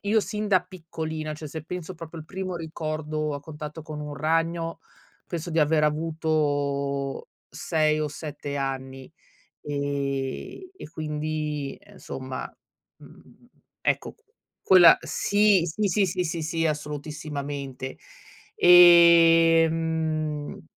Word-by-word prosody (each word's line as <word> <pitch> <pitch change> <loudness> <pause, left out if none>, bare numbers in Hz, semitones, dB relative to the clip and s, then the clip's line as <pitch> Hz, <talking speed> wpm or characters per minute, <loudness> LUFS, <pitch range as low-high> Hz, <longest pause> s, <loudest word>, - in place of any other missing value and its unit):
io 215 +2 +2
sin 210 0 -4
da 185 -2 +4
piccolina, 160 -3 -6
cioè, 155 0 -8
se 160 +1 -7
penso 180 +1 -6
proprio 165 0 -9
al 155 - -12
primo 185 -1 -5
ricordo, 155 -2 -4
a 145 - -5
contatto 150 +1 -8
con 150 -1 -7
un 150 -1 -6
ragno, 165 +2 -1 0.5
penso 170 0 -5
di 160 -1 +1
aver 150 0 +3
avuto 145 -3 -1 0.2
6 155 -1 0
o 150 - -1
7 145 -1 -6
anni, 135 -1 -5 0.5
ehm, 140 - -3 0.2
e - - -10
quindi, 150 -2 -4
e 200 0 -19
insomma, 130 -7 -7 0.4
mhmm, - - -18 0.3
ecco - - -1
q - - -32 0.5
quella 175 -3 +8
sì, 205 -3 +2
sì, 195 +3 +1
sì, 180 +1 -1
sì, 165 0 -3
sì, 165 +1 -1
assolutissimamente, 145 -3 -5 0.6
ehm, 170 -2 +7
mhmm 155 -2 -3
155 Hz, 120 wpm, -25 LUFS, 145-165 Hz, 0.6 s, quella